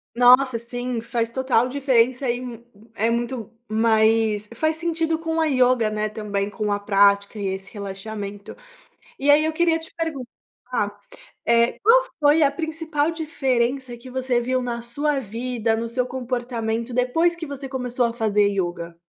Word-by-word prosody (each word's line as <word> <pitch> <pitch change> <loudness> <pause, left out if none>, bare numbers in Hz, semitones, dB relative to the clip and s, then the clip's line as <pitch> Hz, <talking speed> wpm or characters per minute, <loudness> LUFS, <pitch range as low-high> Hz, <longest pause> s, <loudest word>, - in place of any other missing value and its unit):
Nossa, 250 0 +5
sim! 245 +1 -4
Faz 230 0 -2
total 255 -1 +1
diferença 260 -1 +2
e 240 +1 -1
hum, 240 -2 -8 0.3
é 225 +3 +1
muito 235 -1 -2 0.2
mais 220 -1 +2
faz 315 +5 0
sentido 330 -1 0
com 325 0 -2
a 320 - +3
ioga, 255 -5 +3
né, 215 0 -2
também 205 -2 -3
com 210 0 -3
a 205 - 0
prática 200 +1 +3
e 200 - -2
esse 190 0 -5
relaxamento. 200 0 -6 0.7
E 280 - 0
aí, 295 +2 +6
eu 315 - -1
queria 330 0 +2
te 325 0 -11
perguntar, 300 -7 -5 0.5
eh, 235 0 +3
qual - - +5 0.2
foi 295 +2 +5
a 280 - +5
principal 320 -1 -1
diferença 265 -6 -1
que 250 +2 -12
você 260 -1 0
viu 255 +2 0
na 240 -1 -4
sua 285 +5 -1
vida, 230 -1 -2
no 230 +1 -3
seu 250 +2 -1
comportamento, 240 -2 -3
depois 255 +8 +2
que 335 -1 -6
você 280 -1 -6
começou 250 -2 -1
a 235 - 0
fazer 210 -3 +2
ioga? 175 -3 -3
245 Hz, 160 wpm, -23 LUFS, 220-275 Hz, 0.7 s, aí